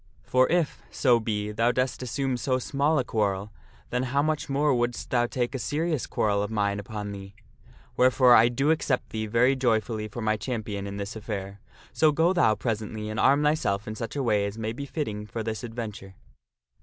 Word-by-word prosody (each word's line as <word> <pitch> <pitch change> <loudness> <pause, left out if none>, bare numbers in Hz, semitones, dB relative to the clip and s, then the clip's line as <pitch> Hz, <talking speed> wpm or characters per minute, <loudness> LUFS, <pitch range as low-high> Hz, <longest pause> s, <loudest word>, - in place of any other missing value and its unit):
For 130 0 +3
if, 170 -4 0
so 125 -4 +3
be, 105 -2 -2
thou 115 +3 +2
dost 125 +1 -1
assume 130 +1 -1
so 130 +2 0
small 140 +4 +1
a 130 - +2
quarrel, 105 -3 -1 0.4
then 125 - 0
how 135 +3 +1
much 155 0 -1
more 140 +1 +2
wouldst 120 -1 -2
thou 120 -1 +2
take 120 +1 -2
a 135 - -3
serious 155 +1 -1
quarrel 100 -2 +1
of 105 - -2
mine 100 -2 0
upon 105 0 -5
thee? 100 0 -9 0.6
Wherefore 125 0 +5
I 120 0 +7
do 135 +5 +1
accept 150 -5 0
thee 110 0 -3
very 120 +5 +3
joyfully 110 -4 0
for 110 +3 -7
my 110 0 +1
champion 105 -4 -4
in 100 0 -6
this 100 +1 -5
affair. 100 -2 -5 0.3
So 155 -1 +4
go 165 +5 +3
thou 170 -12 +3
presently 110 -2 -3
and 110 - -3
arm 140 +2 +4
thyself 125 -10 +1
in 110 - -3
such 115 +2 -6
a 140 - -1
way 105 -4 +2
as 100 +2 -7
may 110 0 -3
be 140 +4 -6
fitting 105 -9 -4
for 115 +1 -4
this 110 +2 -4
adventure." 110 -5 -7
115 Hz, 200 wpm, -26 LUFS, 105-135 Hz, 0.6 s, I